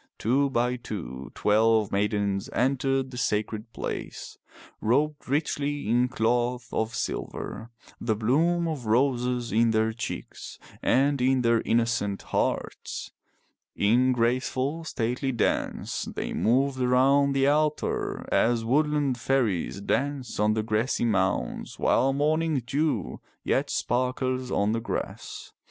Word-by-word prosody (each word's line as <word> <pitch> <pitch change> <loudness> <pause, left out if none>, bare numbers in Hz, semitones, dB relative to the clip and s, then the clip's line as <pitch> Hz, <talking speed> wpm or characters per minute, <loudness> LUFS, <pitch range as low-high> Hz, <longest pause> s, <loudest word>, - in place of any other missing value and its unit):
Two 135 +5 +2
by 125 -1 0
two 75 - -7
twelve 110 0 +3
maidens 100 -1 0
entered 135 +1 +1
the 125 - -6
sacred 110 0 -2
place, - - -6 0.5
robed 145 +5 0
richly 145 -2 -1
in 120 +3 +3
cloth 120 0 0
of 110 0 -1
silver, 110 0 -4 0.3
the 110 -2 0
bloom 165 +10 +2
of 145 -8 -4
roses 125 0 +1
in 115 +2 +3
their 110 0 +1
cheeks 115 +1 -6 0.2
and 140 +1 +2
in 130 0 +3
their 115 -1 +3
innocent 115 -4 0
hearts. - - -2 0.6
In 120 +5 +3
graceful 130 +5 0
stately 125 -1 -1
dance 115 -4 -1
they - - -4
moved 130 +3 +1
around 135 +3 +4
the 135 0 +2
altar 150 +1 0
as 115 -1 +2
woodland 145 0 +1
fairies 110 -8 0
dance 135 +2 -2
on 105 +1 +3
the 110 - 0
grassy 110 +3 0
mounds 95 -4 -1
while 135 - +3
morning 150 0 +1
dew 135 - -1 0.2
yet - - 0
sparkles 130 +1 -1
on 100 -2 +1
the 115 +1 -1
grass. 115 - -5
125 Hz, 120 wpm, -26 LUFS, 110-135 Hz, 0.6 s, around